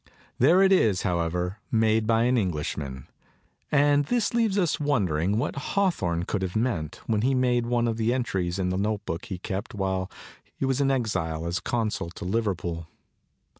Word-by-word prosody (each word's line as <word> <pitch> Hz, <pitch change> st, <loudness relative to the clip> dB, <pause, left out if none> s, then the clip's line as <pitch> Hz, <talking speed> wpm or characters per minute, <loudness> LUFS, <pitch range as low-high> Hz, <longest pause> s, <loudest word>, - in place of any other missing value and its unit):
There 170 Hz, +10 st, +6 dB
it 190 Hz, -, +4 dB
is, 110 Hz, -, +3 dB
however, 90 Hz, +3 st, -1 dB
made 110 Hz, -1 st, +2 dB
by 115 Hz, 0 st, +3 dB
an 125 Hz, +1 st, +3 dB
Englishman; 75 Hz, -, -2 dB, 0.7 s
and 145 Hz, 0 st, +4 dB
this 235 Hz, -, 0 dB
leaves 225 Hz, -4 st, +2 dB
us 175 Hz, -5 st, +1 dB
wondering 100 Hz, -, +1 dB
what 120 Hz, -, -1 dB
Hawthorne 140 Hz, -, 0 dB
could 95 Hz, +2 st, -2 dB
have 95 Hz, -2 st, -3 dB
meant 110 Hz, -, -1 dB
when 110 Hz, -2 st, +1 dB
he 130 Hz, +3 st, +2 dB
made 125 Hz, -2 st, +2 dB
one 120 Hz, -1 st, +1 dB
of 115 Hz, -1 st, -1 dB
the 115 Hz, +1 st, +1 dB
entries 95 Hz, -8 st, -1 dB
in 90 Hz, -1 st, 0 dB
the 90 Hz, -, -1 dB
notebook 100 Hz, -4 st, -2 dB
he 95 Hz, -, -5 dB
kept 95 Hz, +3 st, -5 dB
while 95 Hz, -1 st, -1 dB, 0.5 s
he -, -, -2 dB
was 135 Hz, +1 st, +1 dB
in 135 Hz, -, +3 dB
exile 85 Hz, -11 st, -1 dB
as 85 Hz, +3 st, -1 dB
consul 110 Hz, -7 st, -2 dB
to -, -, -7 dB
Liverpool. 90 Hz, -5 st, -2 dB
110 Hz, 170 wpm, -26 LUFS, 90-130 Hz, 0.7 s, There